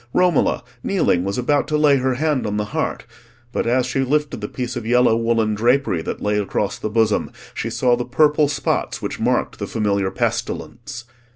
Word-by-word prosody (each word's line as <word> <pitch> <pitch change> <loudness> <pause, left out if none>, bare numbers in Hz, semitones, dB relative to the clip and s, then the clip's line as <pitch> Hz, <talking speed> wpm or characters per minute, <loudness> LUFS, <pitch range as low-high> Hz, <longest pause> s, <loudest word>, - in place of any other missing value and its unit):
Romola, 180 -5 +2 0.2
kneeling, 90 - +1
was 100 +1 -2
about 140 +3 +1
to 150 - +1
lay 150 -2 +5
her 130 -1 0
hand 150 -3 0
on 105 0 -2
the 105 - -1
heart; - - -2 0.5
but - - -1
as 125 +1 +2
she 130 +2 -2
lifted 145 -1 0
the 105 - -3
piece 125 +2 -4
of 120 - -4
yellow 120 0 +4
woollen 115 -1 +1
drapery 120 -4 +2
that - - -5
lay 105 0 +1
across 100 0 -2
the 110 - -3
bosom, 110 -1 +1 0.2
she - - -3
saw 125 -1 +2
the 120 - -2
purple 150 +4 +3
spots 140 -2 -1
which - - -5
marked - - 0
the - - -3
familiar 100 -3 0
pestilence. 120 +4 -3
120 Hz, 190 wpm, -21 LUFS, 105-140 Hz, 0.5 s, lay